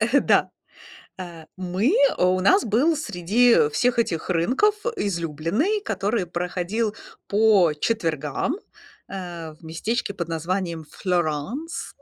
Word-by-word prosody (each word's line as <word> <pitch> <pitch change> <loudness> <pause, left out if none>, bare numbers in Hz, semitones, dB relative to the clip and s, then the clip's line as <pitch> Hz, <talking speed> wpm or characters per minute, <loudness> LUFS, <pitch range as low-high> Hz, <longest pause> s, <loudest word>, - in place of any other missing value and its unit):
Э. 240 +6 +3
Да. - - +3 0.7
Э, 170 -3 -8
мы 185 - 0 0.2
у 185 +1 +3
нас 380 - +4
был 255 +10 +2
среди 225 - +3
всех 245 +9 +1
этих 175 -8 -1
рынков 250 - +2 0.2
излюбленный, 190 - -1
который 200 - -1
проходил 180 +5 -2 0.3
по 205 -6 +4
четвергам, 165 - -1 0.5
э, 175 -4 -6
в 155 - -23
местечке 200 +7 -2
под 170 -4 -4
названием 165 0 -2
Флёранс. 180 - -2
185 Hz, 110 wpm, -24 LUFS, 170-230 Hz, 0.7 s, нас